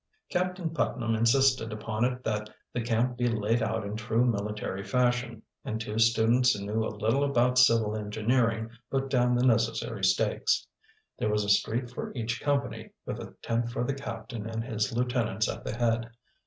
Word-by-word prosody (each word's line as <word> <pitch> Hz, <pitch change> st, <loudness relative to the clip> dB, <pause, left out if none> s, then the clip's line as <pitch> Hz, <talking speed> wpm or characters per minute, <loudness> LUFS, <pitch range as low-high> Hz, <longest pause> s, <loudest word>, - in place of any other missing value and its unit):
Captain 180 Hz, -2 st, -1 dB
Putnam 120 Hz, -7 st, -1 dB
insisted 115 Hz, +1 st, +3 dB
upon 110 Hz, +1 st, -2 dB
it 125 Hz, 0 st, 0 dB
that 105 Hz, -1 st, -2 dB, 0.2 s
the 120 Hz, -, -1 dB
camp 120 Hz, +2 st, 0 dB
be 120 Hz, -, +2 dB
laid 115 Hz, 0 st, +1 dB
out 110 Hz, -1 st, -1 dB
in 100 Hz, +1 st, -4 dB
true 115 Hz, +2 st, +1 dB
military 105 Hz, -3 st, -2 dB
fashion, 120 Hz, -1 st, 0 dB, 0.2 s
and 110 Hz, -, -3 dB
two 110 Hz, 0 st, -3 dB
students 115 Hz, +2 st, +4 dB
who 100 Hz, -1 st, -5 dB
knew 110 Hz, +2 st, 0 dB
a -, -, -1 dB
little 110 Hz, +6 st, 0 dB
about 125 Hz, -2 st, +3 dB
civil 115 Hz, -4 st, +4 dB
engineering 110 Hz, +2 st, 0 dB, 0.2 s
put 135 Hz, 0 st, -1 dB
down 125 Hz, -2 st, +3 dB
the 125 Hz, +1 st, +2 dB
necessary 115 Hz, -2 st, +1 dB
stakes. -, -, +2 dB, 0.5 s
There 105 Hz, -, +1 dB
was 105 Hz, 0 st, +1 dB
a 100 Hz, -, -3 dB
street 115 Hz, +4 st, +1 dB
for -, -, -5 dB
each 115 Hz, -1 st, -2 dB
company, 140 Hz, -3 st, -1 dB, 0.2 s
with -, -, -4 dB
a -, -, -9 dB
tent 115 Hz, +1 st, 0 dB
for 120 Hz, -, -2 dB
the 140 Hz, -, -1 dB
captain 115 Hz, -4 st, -6 dB
and 115 Hz, 0 st, -3 dB
his 110 Hz, -1 st, -1 dB
lieutenants 120 Hz, -3 st, 0 dB
at -, -, -5 dB
the -, -, -4 dB
head. 115 Hz, 0 st, 0 dB
115 Hz, 180 wpm, -28 LUFS, 110-125 Hz, 0.5 s, students